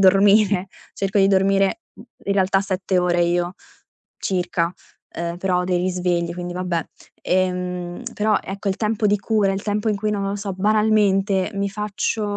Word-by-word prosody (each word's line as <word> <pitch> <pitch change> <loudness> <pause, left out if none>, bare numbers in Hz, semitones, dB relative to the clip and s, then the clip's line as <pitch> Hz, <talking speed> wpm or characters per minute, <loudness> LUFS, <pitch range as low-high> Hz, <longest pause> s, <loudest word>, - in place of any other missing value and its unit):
dormire. 195 0 +5 0.3
Cerco 195 +1 0
di 195 0 +5
dormire, 195 - +2
mhmm, - - -14 0.2
in 200 - 0
realtà, 190 0 +3
7 190 -1 -1
ore 175 -1 +2
io, 175 +1 0 0.6
circa, 180 -2 -1 0.4
uhm, 170 0 -3
però 180 -1 +1
ho - - -1
dei 180 -1 +1
risvegli, 175 -1 0
quindi, 175 0 -5
vabbè. 180 -2 -2 0.4
Ehm, 180 +1 -1
però, 215 0 +2
ecco, 195 +1 -4
il 190 - 0
tempo 215 0 0
di 205 0 +3
cura, 205 -2 +1
il 195 - -3
tempo 210 +1 -1
in 210 - +1
cui 215 +1 -1
non 200 -1 -1
lo 195 +1 -2
so, 200 -1 -4
banalmente 205 -1 +2
mi 200 0 -1
faccio 210 +2 -2
195 Hz, 170 wpm, -22 LUFS, 180-205 Hz, 0.6 s, dormire